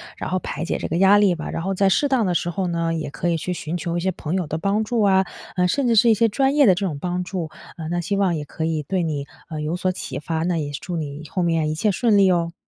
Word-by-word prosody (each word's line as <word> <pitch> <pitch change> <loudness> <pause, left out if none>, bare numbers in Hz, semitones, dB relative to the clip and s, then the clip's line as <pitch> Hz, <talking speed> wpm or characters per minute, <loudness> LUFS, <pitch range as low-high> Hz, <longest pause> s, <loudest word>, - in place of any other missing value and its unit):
然 - - -5
后 185 - +1
排 155 -2 -5
解 170 - -1
这 - - -4
个 165 - -2
压 195 +3 +6
力 200 -4 +4
吧。 155 - -6
然 165 - -3
后 195 +2 -1
在 195 +1 +3
适 285 +10 +3
当 260 -5 +2
的 180 - +1
时 175 - 0
候 185 +2 -2
呢， 170 -1 -1
也 160 -3 -3
可 140 +5 -3
以 170 - +2
去 165 +3 -3
寻 165 -2 -4
求 170 0 -2
一 - - 0
些 190 +2 0
朋 165 +2 -4
友 180 -5 -1
的 155 - -2
帮 200 +5 0
助 235 0 0
啊， 190 -2 +4 0.3
嗯， 180 0 +3
甚 260 +6 +1
至 230 - +3
是 230 +3 +6
一 - - +7
些 225 +2 +3
专 270 +5 +1
业 290 -2 +6
的 190 - +7
这 195 +2 -2
种 155 -6 -3
帮 180 +1 -2
助。 175 -4 -4 0.3
嗯， 160 -2 -6
那 175 - 0
希 180 +4 -1
望 195 -3 +2
也 150 -2 -3
可 160 - -5
以 160 -1 0
对 180 +5 -1
你， 145 -3 -3 0.2
呃， 155 -1 -5
有 155 +3 -2
所 185 +1 0
启 180 - -5
发， 160 +2 -2
那 175 +1 0
也 145 -2 -3
祝 170 +5 -5
你 150 -1 -5
后 180 - -1
面 165 -2 +1
一 155 - -2
切 210 +6 +1
顺 215 +1 +2
利 195 -2 +5
哦。 170 -1 0
175 Hz, 330 characters per minute, -22 LUFS, 160-195 Hz, 0.3 s, 一